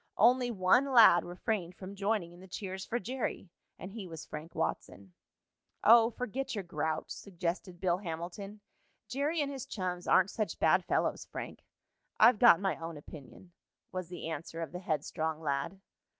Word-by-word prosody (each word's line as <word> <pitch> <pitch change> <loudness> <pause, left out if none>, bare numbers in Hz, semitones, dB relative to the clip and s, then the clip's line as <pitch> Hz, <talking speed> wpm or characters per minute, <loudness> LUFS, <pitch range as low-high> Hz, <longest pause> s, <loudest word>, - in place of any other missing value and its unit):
Only 245 +3 +5
one 235 +6 +3
lad 220 -8 +8
refrained 180 0 -3
from 190 +1 -8
joining 200 -3 -1
in 175 - -15
the 190 - -13
cheers 190 +1 -5
for 240 - -1
Jerry, 240 -5 -4 0.3
and 185 - -8
he 205 -3 -7
was 160 -2 -8
Frank 155 +3 -8
Watson. 95 -2 -4 0.7
"Oh, 230 +1 +7
forget 250 +2 -4
your 200 - -3
grouch," 160 -2 -3
suggested 180 -1 -4
Bill 180 -1 +1
Hamilton. 190 +4 -6 0.5
"Jerry 295 +5 0
and 285 -1 -1
his 270 -3 -6
chums 180 -3 -4
aren't 190 +1 +4
such 215 -2 -2
bad - - +4
fellows, - - 0
Frank." - - -8 0.6
"I've 235 -3 +7
got 240 -9 +8
my 195 -1 -1
own 165 -1 -6
opinion," 150 +4 -12 0.4
was 185 -2 -4
the 175 -2 -6
answer 165 +1 -5
of 160 - -7
the 180 - -6
headstrong 160 -1 -2
lad. 145 +4 -2
185 Hz, 165 wpm, -32 LUFS, 170-220 Hz, 0.7 s, lad